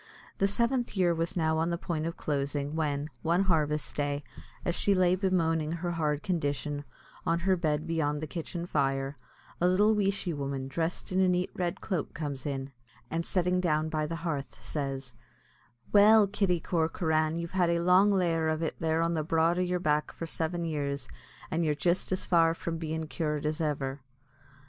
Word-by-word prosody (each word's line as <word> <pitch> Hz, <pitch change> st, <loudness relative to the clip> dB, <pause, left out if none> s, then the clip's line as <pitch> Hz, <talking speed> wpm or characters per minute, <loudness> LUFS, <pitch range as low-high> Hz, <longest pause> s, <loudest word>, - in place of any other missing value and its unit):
The 195 Hz, -, +4 dB
seventh 235 Hz, +2 st, 0 dB
year 175 Hz, -2 st, +4 dB
was 165 Hz, +2 st, -2 dB
now 160 Hz, -1 st, +2 dB
on 165 Hz, +1 st, +1 dB
the 170 Hz, -, -1 dB
point 165 Hz, -2 st, -2 dB
of 165 Hz, -, -5 dB
closing, 145 Hz, 0 st, -2 dB
when, 145 Hz, -2 st, -1 dB
one 170 Hz, +4 st, +2 dB
harvest 150 Hz, -5 st, +1 dB
day, 145 Hz, 0 st, -1 dB, 0.4 s
as 175 Hz, -, +1 dB
she 200 Hz, +3 st, +2 dB
lay 180 Hz, -1 st, +4 dB
bemoaning 165 Hz, -5 st, +1 dB
her 175 Hz, +1 st, -2 dB
hard 150 Hz, -3 st, -1 dB
condition, 145 Hz, -4 st, -2 dB, 0.4 s
on 165 Hz, +1 st, +1 dB
her 190 Hz, +1 st, +3 dB
bed 155 Hz, -3 st, 0 dB
beyond 155 Hz, -3 st, 0 dB
the 155 Hz, -, -3 dB
kitchen 170 Hz, +2 st, -5 dB
fire, 135 Hz, -3 st, 0 dB, 0.5 s
a 175 Hz, -, +5 dB
little 205 Hz, +4 st, +4 dB
weeshy 195 Hz, -4 st, 0 dB
woman, 140 Hz, -2 st, -3 dB
dressed 165 Hz, +7 st, -3 dB
in 185 Hz, -, +1 dB
a 190 Hz, -1 st, +4 dB
neat 180 Hz, 0 st, +1 dB
red 175 Hz, -2 st, -2 dB
cloak, 180 Hz, -7 st, -3 dB
comes 145 Hz, -3 st, -4 dB
in, 135 Hz, -1 st, -3 dB, 0.4 s
and, 165 Hz, +1 st, 0 dB
sitting 180 Hz, +1 st, +1 dB
down 155 Hz, -2 st, +1 dB
by 155 Hz, -1 st, -1 dB
the 165 Hz, -, -3 dB
hearth, 145 Hz, -5 st, -3 dB
says: 135 Hz, -4 st, -4 dB, 0.8 s
"Well, 210 Hz, +1 st, +8 dB
Kitty 195 Hz, -3 st, +1 dB
Corcoran, 160 Hz, -1 st, +1 dB
you've 170 Hz, 0 st, -4 dB
had 180 Hz, -2 st, +2 dB
a 170 Hz, -, +2 dB
long 180 Hz, +3 st, +5 dB
lair 170 Hz, -5 st, +2 dB
of 160 Hz, +1 st, -1 dB
it 160 Hz, -, -3 dB
there 160 Hz, 0 st, +1 dB
on 165 Hz, 0 st, +1 dB
the 155 Hz, -2 st, 0 dB
broad 165 Hz, +2 st, +2 dB
o' -, -, +2 dB
yer 180 Hz, 0 st, 0 dB
back 150 Hz, -3 st, +1 dB
for 165 Hz, -, -6 dB
seven 165 Hz, +1 st, -2 dB
years, 140 Hz, -3 st, -2 dB, 0.4 s
an' 165 Hz, -, +1 dB
you're 155 Hz, -3 st, +1 dB
jist 175 Hz, +5 st, 0 dB
as 185 Hz, -, -1 dB
far 165 Hz, -1 st, +4 dB
from 165 Hz, -1 st, -4 dB
bein' 160 Hz, 0 st, -3 dB
cured 150 Hz, -2 st, -2 dB
as 155 Hz, +2 st, -1 dB
ever." 140 Hz, -3 st, -2 dB
165 Hz, 185 wpm, -29 LUFS, 150-180 Hz, 0.8 s, Well